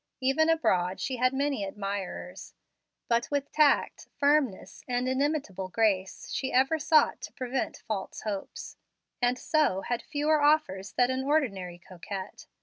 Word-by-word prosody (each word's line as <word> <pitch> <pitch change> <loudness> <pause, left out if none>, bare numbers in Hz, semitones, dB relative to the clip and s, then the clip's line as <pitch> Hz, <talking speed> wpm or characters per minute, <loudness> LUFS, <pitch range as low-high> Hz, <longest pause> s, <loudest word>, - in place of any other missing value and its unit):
Even 275 +5 +2
abroad 185 - +1
she 260 - -2
had 255 +1 +3
many 275 -4 -1
admirers; 195 -1 -5 0.5
but 235 0 +1
with 285 -1 -2
tact, 300 -2 +2
firmness, 285 -8 +1
and 250 0 0
inimitable 260 - -1
grace, 195 -2 0
she 265 - -2
ever 270 +5 +3
sought 305 +1 +3
to - - -7
prevent 255 0 -3
false 205 -4 -4
hopes, 205 -3 -6 0.4
and 245 +1 +2
so 300 - +1
had 240 +3 -2
fewer 300 +1 +1
offers 290 -10 +2
than 245 +1 +3
an 260 0 -1
ordinary 210 - 0
coquette. 185 +2 -8
255 Hz, 140 wpm, -28 LUFS, 195-290 Hz, 0.5 s, had